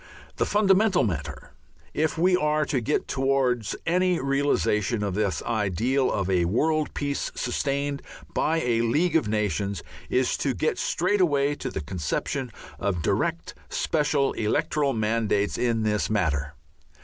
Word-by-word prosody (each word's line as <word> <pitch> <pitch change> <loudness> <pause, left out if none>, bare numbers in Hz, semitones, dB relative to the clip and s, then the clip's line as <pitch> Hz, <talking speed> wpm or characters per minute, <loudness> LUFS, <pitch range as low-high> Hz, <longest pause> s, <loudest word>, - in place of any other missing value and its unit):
The - - +1
fundamental 200 -1 +3
matter, 80 -9 -4 0.4
if 155 +1 0
we 180 +3 +4
are 150 -3 +1
to 130 - -1
get 145 +6 -1
towards 130 -4 0
any 180 +1 +2
realization 120 - +1
of 100 -2 -1
this 100 -5 -1
ideal 115 +5 0
of 95 - -1
a 90 -2 +2
world 155 - 0
peace 140 -1 -2
sustained 140 0 -1 0.3
by 160 +1 +1
a 115 -4 +1
League 150 +11 +1
of 160 -9 +3
Nations, 105 -2 -1 0.3
is 130 0 +1
to 135 -3 -1
get 155 - -1
straight 185 +4 +1
away 145 -4 +2
to - - -5
the - - -4
conception 90 - -3 0.3
of 90 -5 -1
direct 165 +12 -1 0.2
special 150 -3 +1
electoral 145 +5 0
mandates 110 -2 0
in 115 -2 0
this 105 -1 0
matter. 75 -8 0
130 Hz, 140 wpm, -26 LUFS, 105-150 Hz, 0.4 s, we